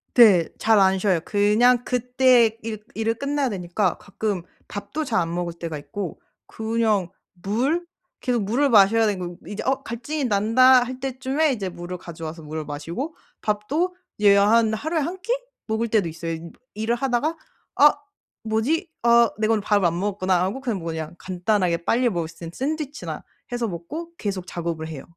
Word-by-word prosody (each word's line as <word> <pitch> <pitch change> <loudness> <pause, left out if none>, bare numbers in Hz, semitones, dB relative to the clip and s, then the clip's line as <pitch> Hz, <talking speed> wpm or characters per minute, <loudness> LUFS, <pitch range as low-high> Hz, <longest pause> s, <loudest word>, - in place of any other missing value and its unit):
네. 200 -9 +7
잘 220 -2 +4
안 190 0 +4
쉬어요. 185 -3 +2
그냥 225 +4 +3
그때 250 -2 +3
일 215 -1 -5
일을 225 +1 0
끝내야 280 +1 -1
되니까 180 0 -1
가끔 200 -2 -3 0.3
밥도 205 +10 -4
잘 230 -7 0
안 165 0 -1
먹을 175 -1 -2
때가 165 -2 -5
있고 180 +5 -6 0.3
그냥 220 -5 0 0.3
물 270 - 0 0.4
계속 245 -5 0
물을 265 +8 +2
마셔야 220 +1 +5
되는 200 -3 -1
거에요. 175 -1 -6
이제 205 - -5
'어 265 +1 0
갈증이 270 +6 -4
난다.' 245 +4 +5
할 255 +1 -7
때쯤에 270 +3 0
이제 210 -7 -2
물을 175 0 -6
가져와서 165 -1 -8
물을 155 +1 -5
마시고 165 - -5 0.3
밥도 275 - 0 0.2
이제 205 -1 +6
한 220 +2 +4
하루에 315 +8 -1
1 345 +6 -3
끼 470 +5 0 0.3
먹을 220 +1 -1
때도 210 -6 +2
있어요. 165 +1 -5
임 165 +1 -6 0.2
일을 220 +3 0
하다가 270 +5 0 0.4
'아 - - +7 0.5
뭐지? 270 - 0
아 235 -1 +6
내가 215 +1 +1
오늘 210 - +1
밥을 205 -2 +2
안 170 +1 +1
먹었구나.' 185 -3 +1
하고 230 +8 -3
그냥 230 -8 -2
뭐 165 - -7
그냥 160 0 -4
간단하게 180 -2 0
빨리 245 +5 +2
먹을 170 -5 -2
수 165 - -16
있는 165 - -7
샌드위치나 300 +1 -4 0.3
해서 240 -1 -1
먹고 295 - -6
계속 195 -3 -4
작업을 165 -2 -4
해요. 145 -4 -7
215 Hz, 340 characters per minute, -23 LUFS, 180-250 Hz, 0.5 s, 네